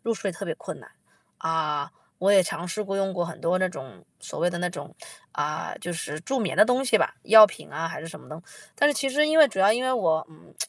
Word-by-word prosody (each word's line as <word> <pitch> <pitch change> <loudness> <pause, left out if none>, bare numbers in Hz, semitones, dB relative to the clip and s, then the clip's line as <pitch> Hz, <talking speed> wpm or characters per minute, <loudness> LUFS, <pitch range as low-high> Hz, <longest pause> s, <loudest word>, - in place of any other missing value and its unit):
入 230 0 -1
睡 195 -2 -4
特 200 - -7
别 160 - -3
困 - - -9
难。 - - -17 0.5
啊， 155 -3 -2 0.3
我 195 +2 +3
也 190 -2 +6
尝 170 0 -5
试 210 +5 -3
过 195 0 -3
用 195 -1 -1
过 175 -1 -2
很 170 - -8
多 180 +2 +1
那 185 - +1
种， 130 -8 -11 0.2
所 - - -9
谓 175 - +2
的 175 - -4
那 180 - -1
种， - - -10 0.4
啊， 150 +1 -3
就 175 - -5
是 155 -3 -5
助 265 +9 -2
眠 195 -6 -2
的 210 - +7
东 250 +3 +1
西 235 -4 +3
吧， - - -1
药 215 +1 +10
品 180 - -12
啊， 165 +1 -4
还 - - -7
是 160 - -9
什 - - -10
么 - - -17
的。 155 +2 -8 0.4
但 290 - +4
是 290 - 0
其 270 0 -1
实 300 +3 +2
因 315 +1 +1
为 310 - +9
主 190 - -9
要 195 +2 +5
因 245 +3 -1
为 260 - +1
我， 165 -10 +1
嗯， 155 - -20
185 Hz, 290 characters per minute, -25 LUFS, 165-220 Hz, 0.5 s, 药